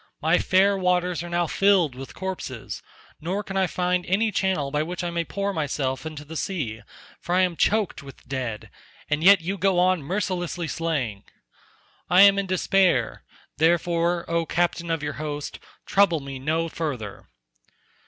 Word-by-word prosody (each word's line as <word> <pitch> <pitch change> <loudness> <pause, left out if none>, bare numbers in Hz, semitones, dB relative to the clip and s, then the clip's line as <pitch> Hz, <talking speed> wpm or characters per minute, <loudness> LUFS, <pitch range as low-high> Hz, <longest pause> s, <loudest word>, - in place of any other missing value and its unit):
My 160 +3 +3
fair 195 +2 +3
waters 180 -1 +1
are 175 - -6
now 175 0 +1
filled 185 -4 +3
with 130 +1 -9
corpses, 185 -10 -5 0.4
nor 190 +6 -2
can 195 - -7
I 190 -1 +2
find 180 0 0
any 215 +4 +2
channel 185 -8 0
by 150 +1 +1
which 175 +3 -4
I 175 - -2
may 170 0 -1
pour 200 +3 -3
myself 140 -3 -2
into 150 -2 -8
the 160 +2 -9
sea 140 - -3 0.4
for 175 - -2
I 185 - +4
am 180 -2 +1
choked 210 0 +1
with 135 -2 -14
dead, 125 -5 -4 0.4
and 150 +1 +1
yet 195 0 +7
you 190 +4 -3
go 190 0 +2
on 180 -1 +3
mercilessly 175 0 -2
slaying. 140 -12 -2 0.8
I 180 +2 +6
am 200 0 +7
in 200 - -2
despair, 185 - +2 0.4
therefore, 170 +1 +2
O 170 0 +1
captain 170 0 0
of 165 -3 -1
your 145 0 -2
host, 145 -1 -5 0.3
trouble 195 -5 +3
me 135 -1 -7
no 160 +4 0
further." 135 -12 -5
170 Hz, 165 wpm, -24 LUFS, 150-185 Hz, 0.8 s, yet